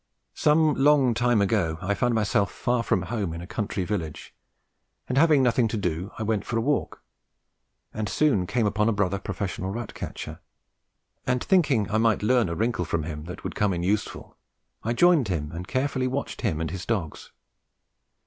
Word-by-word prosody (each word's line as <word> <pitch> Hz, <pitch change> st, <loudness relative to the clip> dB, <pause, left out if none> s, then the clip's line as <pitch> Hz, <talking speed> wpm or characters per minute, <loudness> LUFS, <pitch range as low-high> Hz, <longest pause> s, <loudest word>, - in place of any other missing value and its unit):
Some 155 Hz, 0 st, +3 dB
long 140 Hz, -3 st, +4 dB
time 120 Hz, -2 st, +2 dB
ago 95 Hz, -6 st, 0 dB
I 100 Hz, +2 st, -1 dB
found 120 Hz, +4 st, +1 dB
myself 100 Hz, -2 st, +1 dB
far 120 Hz, -1 st, 0 dB
from 95 Hz, -5 st, 0 dB
home 100 Hz, -6 st, -3 dB
in 85 Hz, -, -6 dB
a -, -, -7 dB
country 105 Hz, -1 st, -3 dB
village, 85 Hz, -6 st, -4 dB, 0.7 s
and 130 Hz, -, -2 dB
having 145 Hz, -1 st, +5 dB
nothing 120 Hz, -1 st, +3 dB
to 110 Hz, -, -3 dB
do, 90 Hz, -1 st, -2 dB
I 110 Hz, -, -3 dB
went 110 Hz, -2 st, 0 dB
for 115 Hz, -, -2 dB
a -, -, +2 dB
walk, 145 Hz, +5 st, -1 dB, 0.9 s
and 110 Hz, -1 st, -3 dB
soon 120 Hz, -13 st, +2 dB
came 120 Hz, +1 st, +1 dB
upon 105 Hz, +1 st, +2 dB
a -, -, +2 dB
brother 100 Hz, -1 st, 0 dB
professional 95 Hz, -1 st, -4 dB
rat 110 Hz, +2 st, -5 dB
catcher; -, -, -7 dB, 0.9 s
and 125 Hz, 0 st, +1 dB
thinking 145 Hz, -, +3 dB
I 110 Hz, -, +2 dB
might 110 Hz, -2 st, +2 dB
learn 120 Hz, -3 st, +3 dB
a 85 Hz, -, -3 dB
wrinkle 110 Hz, -4 st, 0 dB
from 80 Hz, 0 st, -1 dB
him 75 Hz, -1 st, -6 dB
that 90 Hz, +2 st, -8 dB
would -, -, -4 dB
come 105 Hz, -2 st, +1 dB
in 85 Hz, -1 st, -2 dB
useful, 100 Hz, +3 st, -2 dB, 0.5 s
I 115 Hz, -, -1 dB
joined 165 Hz, -2 st, +4 dB
him 75 Hz, -5 st, -2 dB
and 90 Hz, +3 st, -7 dB
carefully 130 Hz, 0 st, 0 dB
watched 135 Hz, +2 st, -4 dB
him 95 Hz, -10 st, 0 dB
and 80 Hz, -1 st, -2 dB
his 95 Hz, -1 st, -5 dB
dogs. 95 Hz, -10 st, -3 dB
105 Hz, 185 wpm, -26 LUFS, 95-125 Hz, 0.9 s, having